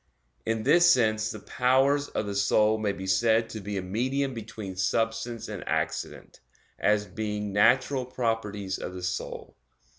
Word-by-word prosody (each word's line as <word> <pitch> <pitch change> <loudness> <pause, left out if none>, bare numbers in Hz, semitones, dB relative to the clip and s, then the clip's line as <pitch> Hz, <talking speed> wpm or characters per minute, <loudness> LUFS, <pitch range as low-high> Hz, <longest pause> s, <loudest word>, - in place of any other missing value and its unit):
In 115 -1 0
this 175 +5 +6
sense 110 -5 +2
the - - -5
powers 135 +3 +2
of - - -3
the 100 - -4
soul 105 +2 +3
may 105 -2 0
be 95 -1 -7
said 110 +4 +2
to 110 - -5
be 100 0 -4
a 95 - -3
medium 130 +8 -1
between 110 -4 -7
substance 115 +4 -1
and - - -6
accident, - - -3 0.4
as 105 0 +2
being 105 -1 -4
natural 130 +5 +3
properties 105 -6 -2
of 90 - -6
the 90 - -7
soul. 90 0 -5
110 Hz, 155 wpm, -27 LUFS, 100-125 Hz, 0.4 s, this